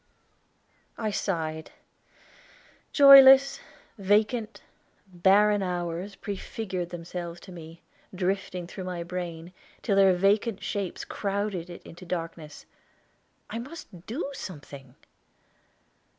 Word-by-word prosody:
I 215 -2 -2
sighed. 160 -6 -3 1.2
Joyless, 275 -1 +8 0.4
vacant, 215 +3 +1 0.4
barren 200 +3 +3
hours 180 +1 -3
prefigured 190 -3 -5
themselves 175 0 -7
to 185 - -12
me, 165 -1 -11 0.3
drifting 185 -1 -2
through 185 +2 -8
my 180 -2 -4
brain, 175 -1 -6 0.3
till 200 - +1
their 195 -1 +6
vacant 200 +3 +1
shapes 200 -3 -4
crowded 200 -3 -3
it 175 - -10
into 175 +2 -12
darkness. 165 -3 -6 0.8
I 230 - -5
must 235 - -10
do 255 +9 -3
something! 140 - -10
185 Hz, 95 wpm, -27 LUFS, 170-205 Hz, 1.2 s, Joyless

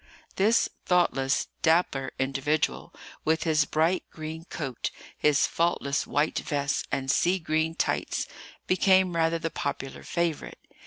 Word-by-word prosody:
This 215 +3 +3 0.2
thoughtless, 140 -7 +2 0.2
dapper 160 -5 +2
individual, 140 +3 -1 0.3
with 160 +1 +1
his 155 -3 +3
bright 160 +5 +1
green 160 +1 -7
coat, 135 -8 -4 0.3
his 150 -2 +3
faultless 160 -4 0
white 150 +2 +1
vest, 140 -1 -1
and 135 0 0
sea 180 +6 +3
green 160 -1 -1
tights, - - -1 0.4
became 185 -1 +3
rather 165 0 +2
the 165 0 -3
popular 135 -2 -4
favourite. 170 -3 -2
160 Hz, 120 wpm, -27 LUFS, 140-170 Hz, 0.4 s, This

